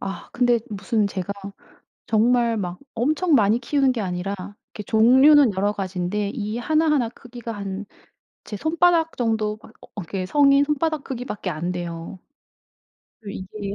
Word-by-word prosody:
아. 195 0 -6
근데 245 -1 +3
무슨 210 +1 -1
제가 195 -1 -4 0.8
정말 230 +1 +2
막 180 -2 -4
엄청 305 +8 +1
많이 215 -1 +3
키우는 270 +1 +2
게 240 -3 -3
아니라 185 +1 -3 0.4
이렇게 210 - -7
종류는 260 +4 +6
여러 200 +2 +1
가지인데 195 +1 -2
이 215 -3 -3
하나하나 300 -1 +1
크기가 240 -1 -9
한 200 -1 -5 0.6
제 210 - -5
손바닥 330 - +2
정도 220 -3 0
막 - - -15
어 - - -14
이렇게 185 +2 -4
성인 280 +2 +5
손바닥 300 0 -1
크기밖에 235 -7 -5
안 170 +3 -3
돼요. 175 0 -6 1.0
그리고 200 -2 -7
이게 200 -1 -3
220 Hz, 305 characters per minute, -23 LUFS, 195-265 Hz, 1.0 s, 종류는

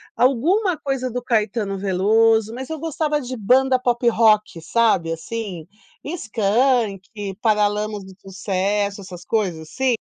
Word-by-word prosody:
Alguma 325 - +2
coisa 270 -3 -2
do 245 +1 -4
Caetano 210 -3 0
Veloso, 220 +3 +2
mas 260 +4 -7
eu 320 - -4
gostava 305 -2 -1
de 255 0 -6
banda 255 +4 +3
pop 245 -1 -1
rock, 215 -6 +3
sabe, 170 -3 +1
assim, 190 -2 -6 0.4
Skank, 225 - 0 0.4
Paralamas 210 -1 +1
do 190 - -12
Sucesso, 200 +1 -2
essas 180 -2 -10
coisas 190 -8 -1
assim. 245 +9 -1
220 Hz, 125 wpm, -21 LUFS, 200-255 Hz, 0.4 s, banda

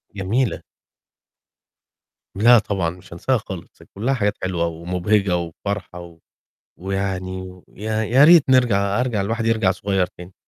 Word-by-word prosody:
جميلة. 105 +3 -1 1.7
لأ 120 +3 +6
طبعًا، 95 -5 -2
مش 90 0 -12
هانساها 130 +9 0
خالص، 95 -5 -10
كلّها 120 +7 0
حاجات 105 -4 -1
حلوة 90 -2 -1
ومُبهجة 90 +3 0
وفرحة، 90 +2 -5
و 85 -1 -12 0.6
ويعني 95 -1 -4
يا 110 +2 -2
يا 130 +6 +4
ريت 165 -4 +7
نرجع 105 -5 +3
أرجع، 120 -5 0
الواحد 115 +3 -2
يرجع 110 -4 +2
صغير 95 0 -1
تاني. 90 +1 -13
100 Hz, 125 wpm, -21 LUFS, 90-110 Hz, 1.7 s, ريت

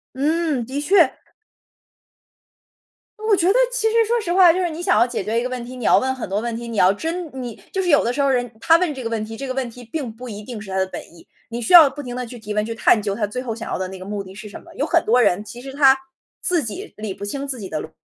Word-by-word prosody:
嗯， 300 -2 0
的 270 +4 -4
确。 335 -3 +3 2.1
我 420 - +5
觉 355 -1 +1
得 390 - +5 0.2
其 - - 0
实 455 0 +3
说 470 +2 +1
实 345 -3 -2
话， 365 -2 +7
就 365 - -1
是 350 - 0
你 320 +2 -6
想 365 +1 +3
要 235 - +5
解 240 - -3
决 225 +3 0
一 240 - -2
个 255 - -2
问 250 -1 -4
题， 250 +1 -9
你 250 - -8
要 - - +5
问 260 0 -1
很 260 - -5
多 195 +2 0
问 230 +1 -3
题。 235 0 -6
你 230 - -5
要 185 -1 +6
真 330 - -4
你 240 -3 -7
就 380 - -1
是 360 - -1
有 290 - +5
的 240 - 0
时 280 - -1
候 275 - +3
儿 270 - +3
人 245 -2 -2
他 330 0 +6
问 340 -4 0
这 260 - -7
个 230 - -2
问 225 -2 -2
题， 225 +1 -7
这 275 - -6
个 255 - -2
问 255 -2 -2
题 245 +2 -12
并 245 0 -5
不 245 +3 -10
一 210 -1 -7
定 230 -1 -7
是 205 -2 -10
他 190 - -2
的 190 - +2
本 - - -7
意。 170 - -17 0.2
你 235 +1 -5
需 230 - -1
要 320 -5 +10
不 285 +2 -8
停 245 -3 -6
地 250 0 -3
去 240 +1 -10
提 210 -1 -6
问， 210 0 0
去 230 - -4
探 225 -1 +3
究 200 -1 -2
他 210 -1 -1
最 250 +5 -4
后 245 -3 -4
想 230 - -7
要 - - -1
的 185 0 -3
那 190 -1 -9
个 185 - -9
目 200 0 -4
的 190 0 -12
是 210 +1 -9
什 205 - -10
么。 - - -16
有 285 - -1
很 335 0 +2
多 245 +3 +4
人， 195 0 +2
其 240 +3 -10
实 270 0 -8
他 270 -2 +5 0.4
自 350 -5 +1
己 215 -4 -7
理 215 -2 -4
不 200 - -7
清 275 +7 -4
自 260 -4 -4
己 195 - -6
的 155 - -3
逻 160 - -9
245 Hz, 335 characters per minute, -21 LUFS, 215-300 Hz, 2.1 s, 要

